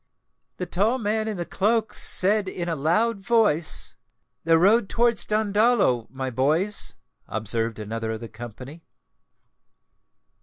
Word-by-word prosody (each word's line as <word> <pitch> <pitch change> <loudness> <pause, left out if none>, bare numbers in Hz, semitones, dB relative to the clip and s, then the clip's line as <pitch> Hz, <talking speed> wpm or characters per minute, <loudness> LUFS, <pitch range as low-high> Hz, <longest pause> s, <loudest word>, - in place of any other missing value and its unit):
"The 180 - -3
tall 205 +8 0
man 220 -1 -1
in 215 -3 -3
the 175 - -4
cloak 215 +5 0
said 200 +1 +2
in 175 -2 -5
a 165 - -1
loud 190 +10 +1
voice, 170 - +1 0.5
'The 165 0 +4
road 200 +5 +3
towards 235 -2 +1
Dandolo, 210 - +2
my 130 +1 -5
boys!'" 155 - +1 0.3
observed 115 +1 -2
another 110 +1 -4
of 110 - -6
the 115 - -8
company. 120 +8 -10
175 Hz, 125 wpm, -24 LUFS, -, 0.5 s, The